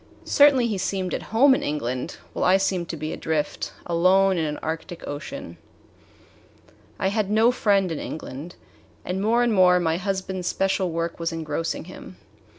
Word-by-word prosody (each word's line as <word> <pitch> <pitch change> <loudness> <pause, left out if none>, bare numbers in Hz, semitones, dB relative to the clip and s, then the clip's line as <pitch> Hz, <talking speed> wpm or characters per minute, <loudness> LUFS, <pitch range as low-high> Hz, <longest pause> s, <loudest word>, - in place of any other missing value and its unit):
Certainly 285 -4 +5
he 210 -4 -1
seemed 185 -1 -2
at - - -2
home 265 +5 +5
in - - 0
England, 130 -4 -3 0.2
while - - -2
I 185 - +5
seemed 190 -3 -1
to 165 - -4
be 155 +1 -4
adrift, 155 -2 -2
alone 185 +3 +3
in 165 -2 0
an 150 -1 -3
arctic 165 +2 -5
ocean. 275 - -7 1.4
I 190 - 0
had 205 -1 -1
no 220 +3 +4
friend 200 -7 +2
in 160 - -3
England, 155 +2 -7 0.5
and 185 +1 -2
more 230 +4 +3
and 240 -2 +2
more 180 -2 +5
my 165 -1 0
husband's 190 -1 -3
special 190 -1 0
work 165 0 -3
was 165 +1 -1
engrossing 165 0 -3
him. 185 +1 -11
185 Hz, 165 wpm, -24 LUFS, 165-200 Hz, 1.4 s, Certainly